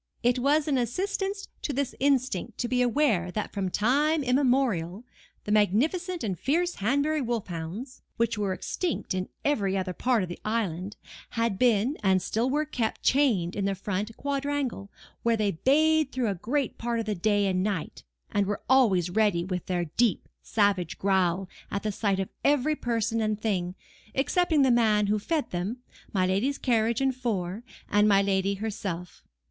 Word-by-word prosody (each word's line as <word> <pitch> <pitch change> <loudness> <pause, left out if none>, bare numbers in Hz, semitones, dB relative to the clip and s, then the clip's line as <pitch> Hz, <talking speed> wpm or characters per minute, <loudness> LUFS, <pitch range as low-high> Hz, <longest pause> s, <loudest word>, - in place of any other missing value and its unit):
It 245 +1 +3
was 290 +4 +2
an 275 -3 +2
assistance 390 - -2
to - - -2
this 280 0 -1
instinct 255 -6 0
to 245 - -1
be 250 +1 +1
aware 240 -8 +2
that 210 - -3
from 195 -2 -1
time 285 - +2
immemorial, 245 - +1 0.4
the 210 - -4
magnificent 300 - +1
and 190 -6 -2
fierce 345 +5 0
Hanbury 285 +8 +1
wolf 235 -4 -2
hounds, 175 - -6 0.2
which 230 0 +1
were 205 -2 -1
extinct 335 - -3
in 185 0 -3 0.2
every 200 -9 +1
other 185 -1 -2
part 245 +1 +1
of 180 - -5
the 175 - -7
island, 205 -3 -2 0.3
had 230 -4 -1
been 245 +3 +3
and 190 -2 +3
still 225 +7 -1
were 300 +3 +1
kept 240 -6 -3
chained 230 -11 +2
in 200 - -1
the 195 0 0
front 205 +3 -3
quadrangle, 280 -6 -2 0.3
where 230 -1 +2
they 210 -2 +1
bayed 305 - +3
through 250 -4 0
a - - 0
great 255 +9 -2
part 235 0 -1
of 225 - -2
the 215 - -1
day 205 +2 +1
and 185 -1 +1
night 195 -4 -3 0.3
and 200 -1 +1
were 205 0 -3
always 200 -10 +4
ready 205 -4 +2
with 180 -2 -4
their 175 -2 0
deep, 225 +7 0
savage 200 -5 +1
growl 190 -1 +1 0.2
at 200 - -3
the 215 - 0
sight 200 -1 0
of 190 - -2
every 290 +1 +3
person 230 -3 -1
and 215 -1 0
thing, 185 -5 -1 0.4
excepting 315 +2 +2
the 260 - +4
man 215 -3 +3
who 210 +1 +1
fed 310 +7 -2
them, 185 +7 -2 0.3
my 185 -3 +2
lady's 210 +10 0
carriage 230 -1 +1
and 265 -1 +1
four, 210 -5 -2 0.3
and 205 +1 +3
my 200 -1 +5
lady 195 0 +1
herself. 195 -4 -5
220 Hz, 175 wpm, -27 LUFS, 195-265 Hz, 0.4 s, my